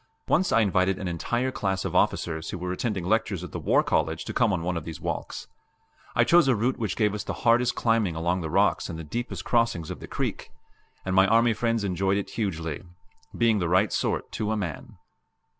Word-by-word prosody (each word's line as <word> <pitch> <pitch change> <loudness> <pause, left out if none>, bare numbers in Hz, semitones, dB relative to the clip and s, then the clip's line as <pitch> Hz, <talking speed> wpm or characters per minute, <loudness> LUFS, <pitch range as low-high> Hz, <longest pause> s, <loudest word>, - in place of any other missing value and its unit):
Once 185 +4 +2
I 115 - +4
invited 95 -2 +2
an 95 - -4
entire 120 +9 -1
class 95 -5 -2
of - - -3
officers 80 -2 0
who - - -4
were 90 +1 -4
attending 95 -1 -2
lectures 100 -2 0
at 90 - -8
the - - -5
War - - +3
College - - 0
to - - -5
come 110 - +2
on 90 -4 -1
one 90 +1 -1
of 85 - -3
these 80 -1 -7
walks; - - -4 0.7
I - - +5
chose 175 -3 +5
a 130 - +4
route 120 +5 0
which 105 -5 -2
gave 105 -3 +1
us 105 - -3
the - - -4
hardest 120 +1 +4
climbing 115 -7 +1
along 85 +3 0
the 80 - -4
rocks - - +2
and 80 - -5
the 80 - -6
deepest 120 +11 -5
crossings 115 -9 +1
of - - -7
the - - -9
creek; - - -4 0.5
and 95 0 -1
my 95 +1 +6
army 115 +1 +4
friends 115 -1 0
enjoyed 95 +1 0
it 100 - -4
hugely 80 -8 -3 0.6
being 115 -3 +3
the 85 -3 -1
right 95 +4 +3
sort, - - -1
to 110 0 -2
a 110 - 0
man. 95 -6 -5
100 Hz, 220 wpm, -26 LUFS, 90-115 Hz, 0.7 s, my